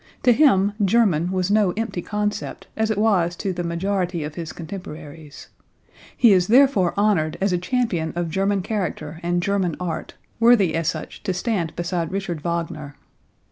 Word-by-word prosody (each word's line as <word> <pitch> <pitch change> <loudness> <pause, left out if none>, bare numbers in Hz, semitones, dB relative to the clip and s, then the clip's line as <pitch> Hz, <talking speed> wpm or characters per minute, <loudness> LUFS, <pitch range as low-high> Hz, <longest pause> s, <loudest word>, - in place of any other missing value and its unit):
To 250 - +6
him 205 -8 +4
"German" 190 -5 +2
was 185 0 0
no 205 -4 +3
empty 225 -5 -2
concept, 210 +2 -3
as 220 0 0
it 220 - 0
was 190 -5 +2
to 190 0 -3
the 175 0 -3
majority 175 0 -1
of 150 0 -5
his 165 -1 -6
contemporaries. 160 -4 -9 0.7
He 230 -4 +6
is 180 -1 +3
therefore 240 -7 +4
honored 195 -7 +1
as 195 -1 +1
a 175 - +1
champion 180 -6 -1
of 170 -2 -2
German 195 +2 0
character 175 -7 -4
and 175 0 0
German 190 -4 0
art, 180 -2 -4 0.2
worthy 230 -7 +5
as 165 -1 -1
such - - -6
to 190 -3 -2
stand 180 -4 -2
beside 170 -1 -2
Richard 190 -5 -3
Wagner. 165 -3 -4
180 Hz, 165 wpm, -22 LUFS, 170-205 Hz, 0.7 s, To